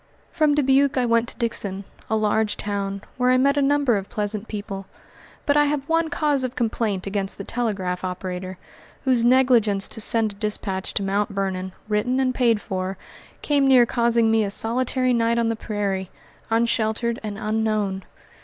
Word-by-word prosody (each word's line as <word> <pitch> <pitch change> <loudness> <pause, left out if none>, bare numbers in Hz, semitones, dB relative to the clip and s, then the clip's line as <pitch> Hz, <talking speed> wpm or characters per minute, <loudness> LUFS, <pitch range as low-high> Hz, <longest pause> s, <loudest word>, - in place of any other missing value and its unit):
From 305 -3 +2
Dubuque 275 -1 +3
I 250 - +2
went 230 0 +2
to - - -7
Dixon, 200 -4 -2 0.3
a 220 - +1
large 215 0 +1
town, 200 -1 -3
where 250 0 +2
I 255 - +5
met 280 +2 +3
a 285 - +2
number 280 -4 +2
of 195 0 -6
pleasant 210 0 -3
people, 200 -2 -6 0.6
but 285 - +2
I 295 0 +5
have 290 -1 -2
one 330 0 +1
cause 290 -3 0
of 255 0 -3
complaint 220 -5 -1
against 195 0 -2
the 200 - -6
telegraph 195 -6 -2
operator, 185 0 -5 0.5
whose 255 -3 +2
negligence 240 -6 +4
to 220 - -1
send 225 -1 +1
a - - -11
dispatch 200 -2 -3
to 200 - +1
Mt. 200 +3 0
Vernon, 190 -2 -3 0.2
written 215 +5 0
and 255 -1 +1
paid 235 -4 +2
for, 190 -1 -4 0.5
came 285 -2 +2
near 255 -3 +6
causing 235 -1 +2
me 225 -1 +3
a 200 - -2
solitary 255 +4 +1
night 230 0 +2
on 230 -1 +1
the 230 - 0
prairie, 200 -4 -3 0.4
unsheltered 230 0 0
and 210 -2 -5
unknown. 215 -3 -1
225 Hz, 175 wpm, -23 LUFS, 200-255 Hz, 0.6 s, near